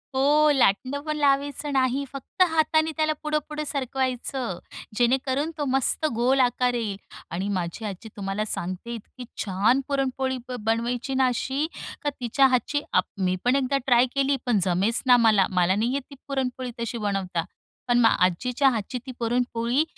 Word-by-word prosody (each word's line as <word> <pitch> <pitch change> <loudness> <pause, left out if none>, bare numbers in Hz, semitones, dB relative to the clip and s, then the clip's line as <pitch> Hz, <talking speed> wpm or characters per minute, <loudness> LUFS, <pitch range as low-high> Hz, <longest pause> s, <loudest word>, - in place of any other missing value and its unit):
हो. 295 +3 +4
लाटणं 260 +4 +2
पण 305 -1 -1
लावायचं 285 0 +1
नाही. 265 +1 +1
फक्त 275 +6 -6
हाताने 315 0 +2
त्याला 310 0 +2
पुढं-पुढं 300 0 -2
सरकवायचं, 260 - -2 0.4
जेणेकरून 265 +5 +1
तो 290 - -1
मस्त 270 +4 +1
गोल 255 +3 +2
आकार 250 0 +2
येईल. 220 -5 -2 0.3
आणि 185 +4 -2
माझी 180 +4 -4
आजी 205 +2 -6
तुम्हाला 195 +2 -2
सांगते 185 +4 -4
इतकी 245 +3 -10 0.2
छान 210 +8 +2
पुरणपोळी 265 -1 -1
ब 250 - -3
बनवायची 240 +3 -1
ना 265 0 +3
अशी, 265 +4 -1 0.3
का 295 - 0
तिच्या 255 +3 +3
हातची 265 +3 0
आप 180 - +4 0.2
मी 185 0 +1
पण 250 - +4
एकदा 275 0 +1
ट्राय 245 0 +5
केली, 275 0 +2
पण 230 -5 +2
जमेच 190 +6 +1
ना 250 -1 +7
मला, 215 -5 +4
मला 185 0 +2
नाही 230 +5 0
येत 280 - -1
ती 280 - -11
पुरणपोळी, 260 -2 -2
तशी 235 0 -3
बनवता. 185 -4 -1 0.4
पण 240 0 +3
मग 225 - +6 0.2
आजीच्या 250 +10 +1
हातची 235 +1 -3
ती 260 - -6
पुरणपोळी, 240 +2 +1
250 Hz, 160 wpm, -25 LUFS, 225-275 Hz, 0.4 s, ना